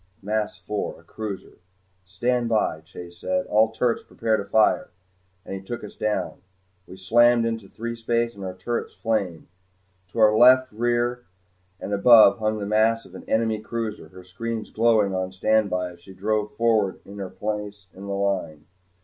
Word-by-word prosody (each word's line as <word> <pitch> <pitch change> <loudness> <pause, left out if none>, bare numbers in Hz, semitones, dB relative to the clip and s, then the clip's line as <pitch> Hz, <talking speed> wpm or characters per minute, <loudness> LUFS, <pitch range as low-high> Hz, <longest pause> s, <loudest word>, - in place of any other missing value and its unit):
Mass 105 +1 -2
four: 105 -1 -4
a - - -20
cruiser. 105 -5 -7 0.5
"Stand 120 +5 -1
by," 110 -8 0
Chase 85 +2 -11
said. 90 +1 -1
"All 110 +1 +3
turrets 115 +1 0
prepare 110 -1 -1
to 100 - -2
fire." 105 +2 +2 0.6
And - - -7
he 95 - -5
took 120 +5 -6
us 105 - -9
down. 105 -1 -2 0.5
We 95 - -11
slammed 120 +4 +4
into 115 -4 -3
threespace 115 0 -2
and 100 - -10
our 95 -1 -5
turrets 115 +6 -4
flamed. 100 -8 -2 0.6
To 90 - -13
our 110 -1 +6
left 130 +2 +6
rear 120 +2 -1 0.5
and 100 - -5
above 110 0 +7
hung 110 0 0
the 105 - -4
mass 110 +2 +2
of 90 - -16
an 95 - -11
enemy 110 -1 +1
cruiser, 110 -1 -5
her 95 0 -14
screens 110 +5 -5
glowing 110 -3 +3
on 95 0 -2
standby 95 -2 +1
as 85 - -16
she 95 +2 -14
drove 105 +2 -1
forward 110 -4 +1
to 100 - -12
her 95 -2 -5
place 105 -1 -5
in 100 +2 -10
the 100 - -3
line. 95 -6 -2
110 Hz, 170 wpm, -24 LUFS, 95-115 Hz, 0.6 s, above